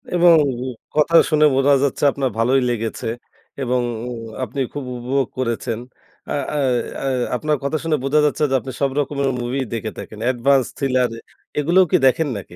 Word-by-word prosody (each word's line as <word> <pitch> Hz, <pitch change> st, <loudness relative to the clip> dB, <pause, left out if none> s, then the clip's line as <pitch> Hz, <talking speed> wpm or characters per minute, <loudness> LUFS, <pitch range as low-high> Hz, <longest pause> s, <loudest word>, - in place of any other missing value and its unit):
এবং 175 Hz, -1 st, +6 dB, 0.6 s
কথা 155 Hz, +2 st, +3 dB
শুনে 155 Hz, -1 st, +4 dB
বোঝা 135 Hz, +1 st, +4 dB
যাচ্ছে 140 Hz, -, -1 dB
আপনার 135 Hz, -1 st, -1 dB
ভালোই 130 Hz, +4 st, +3 dB
লেগেছে। 115 Hz, -1 st, -3 dB, 0.5 s
এবং 125 Hz, -1 st, +1 dB, 0.6 s
আপনি 130 Hz, +3 st, -5 dB
খুব 145 Hz, -, -4 dB
উপভোগ 130 Hz, +2 st, -1 dB
করেছেন। 115 Hz, -2 st, -2 dB, 0.5 s
আ -, -, 0 dB, 0.2 s
অ্যা 150 Hz, -, -2 dB, 0.4 s
অ্যা 135 Hz, -, -1 dB, 0.3 s
আপনার 150 Hz, +2 st, 0 dB
কথা 140 Hz, +3 st, 0 dB
শুনে 155 Hz, -2 st, +1 dB
বোঝা 140 Hz, +3 st, +2 dB
যাচ্ছে 150 Hz, +1 st, 0 dB
যে -, -, +3 dB
আপনি 130 Hz, -, -7 dB
সব 140 Hz, -, +3 dB
রকমের 140 Hz, -1 st, 0 dB
মুভি 125 Hz, +3 st, -2 dB
দেখে 110 Hz, -1 st, -3 dB
থাকেন। 110 Hz, -, -9 dB
Advance, 130 Hz, +1 st, +2 dB
thriller 130 Hz, -3 st, +1 dB, 0.5 s
এগুলোও 175 Hz, +5 st, +4 dB
কি -, -, +5 dB
দেখেন 145 Hz, +5 st, +2 dB
নাকি? 90 Hz, -3 st, -10 dB
135 Hz, 165 wpm, -20 LUFS, 125-150 Hz, 0.6 s, এবং